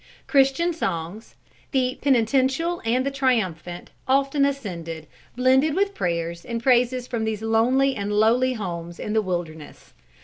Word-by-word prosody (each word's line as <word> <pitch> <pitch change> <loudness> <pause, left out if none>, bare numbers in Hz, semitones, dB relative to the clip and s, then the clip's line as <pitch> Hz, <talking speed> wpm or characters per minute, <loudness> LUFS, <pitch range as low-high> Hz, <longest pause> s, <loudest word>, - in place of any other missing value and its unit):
Christian 275 +5 +2
songs, 190 - -4 0.3
the 255 -3 0
penitential 270 +6 +1
and 245 +3 +1
the 275 - -1
triumphant, 190 - -1 0.2
often 275 +1 +2
ascended, 170 - -4 0.3
blended 260 +4 +3
with 400 +1 +1
prayers 170 - -3
and 235 -1 -5
praises 250 0 +2
from 235 -3 -3
these 220 -1 -3
lonely 250 +5 +2
and 200 0 -3
lowly 230 +5 +3
homes 175 -6 -6
in 210 - -4
the 220 - +3
wilderness. 170 -6 -6
235 Hz, 135 wpm, -23 LUFS, 185-270 Hz, 0.3 s, blended